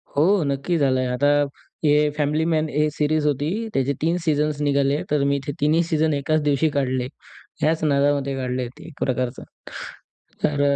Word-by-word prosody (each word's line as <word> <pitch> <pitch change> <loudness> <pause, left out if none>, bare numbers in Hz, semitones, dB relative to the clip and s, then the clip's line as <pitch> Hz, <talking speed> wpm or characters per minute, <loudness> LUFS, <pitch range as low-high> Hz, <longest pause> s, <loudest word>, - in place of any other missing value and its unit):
हो, 175 +6 +3
नक्की 140 +5 -1
झालंय. 130 -3 +2
आता 140 +3 +1 0.6
ए 150 0 +4
फॅमिली 150 +2 +1
मॅन 155 -1 +1
ए 150 +1 +1
सीरीज 155 0 0
होती. 145 +1 0 0.2
त्याचे 135 +1 +1
3 165 +3 +1
सीझन्स 150 -1 +1
निघाले. 140 0 +1
तर 150 -2 +2
मी 140 0 +1
ते - - 0
3न्ही 155 +3 +3
सीझन 160 -2 +1
1च 150 +2 0
दिवशी 145 +2 +2
काढले. 130 -2 0 0.5
ह्याच 160 +1 +1
नादामध्ये 140 -1 +2
काढले 125 -1 -2
ते 160 - -12
एक 165 - -11
प्रकारचं. 125 -1 -2 1.0
तर 145 -1 +1
145 Hz, 160 wpm, -22 LUFS, 140-155 Hz, 1.0 s, ए